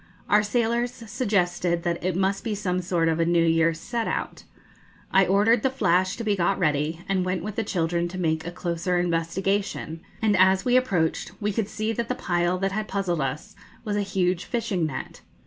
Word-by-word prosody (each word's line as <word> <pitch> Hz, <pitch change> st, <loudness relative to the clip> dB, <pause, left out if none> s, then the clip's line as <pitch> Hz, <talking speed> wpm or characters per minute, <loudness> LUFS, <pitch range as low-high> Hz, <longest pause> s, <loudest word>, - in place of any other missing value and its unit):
Our 210 Hz, +1 st, +5 dB
sailors 235 Hz, +3 st, 0 dB
suggested 180 Hz, -7 st, -1 dB
that 170 Hz, -1 st, -2 dB
it 185 Hz, -1 st, 0 dB
must 195 Hz, +1 st, 0 dB
be 220 Hz, -2 st, -2 dB
'some 185 Hz, -3 st, -1 dB
sort 175 Hz, -2 st, 0 dB
of 165 Hz, 0 st, +1 dB
a -, -, +4 dB
New 170 Hz, -1 st, +3 dB
Year's 165 Hz, 0 st, +2 dB
set 235 Hz, +5 st, -3 dB
out.' -, -, -4 dB, 0.7 s
I 190 Hz, 0 st, +5 dB
ordered 210 Hz, +5 st, +4 dB
the 265 Hz, -, +2 dB
'Flash' 185 Hz, -7 st, +1 dB
to 235 Hz, -, -5 dB
be 210 Hz, -2 st, +1 dB
got 190 Hz, +1 st, +1 dB
ready, 155 Hz, 0 st, 0 dB
and 190 Hz, -2 st, +1 dB
went 185 Hz, 0 st, -2 dB
with 210 Hz, -1 st, -5 dB
the 225 Hz, -, 0 dB
children 170 Hz, -3 st, 0 dB
to 180 Hz, +2 st, -7 dB
make 160 Hz, -3 st, 0 dB
a 175 Hz, -, -4 dB
closer 175 Hz, +1 st, -1 dB
investigation; 175 Hz, 0 st, -1 dB, 0.2 s
and, 215 Hz, -2 st, +2 dB
as 190 Hz, +1 st, +4 dB
we 250 Hz, 0 st, +3 dB
approached, 190 Hz, -11 st, +1 dB
we 210 Hz, -1 st, 0 dB
could 215 Hz, 0 st, -1 dB
see 215 Hz, +1 st, -2 dB
that 230 Hz, +1 st, -3 dB
the -, -, 0 dB
pile 175 Hz, 0 st, 0 dB
that 195 Hz, +1 st, -1 dB
had 215 Hz, +2 st, -2 dB
puzzled 180 Hz, -5 st, -1 dB
us 150 Hz, +10 st, -4 dB, 0.3 s
was 210 Hz, -1 st, -1 dB
a 205 Hz, -, +1 dB
huge 185 Hz, -2 st, 0 dB
fishing 215 Hz, -9 st, -1 dB
net. 130 Hz, -4 st, -7 dB
185 Hz, 200 wpm, -25 LUFS, 170-210 Hz, 0.7 s, Our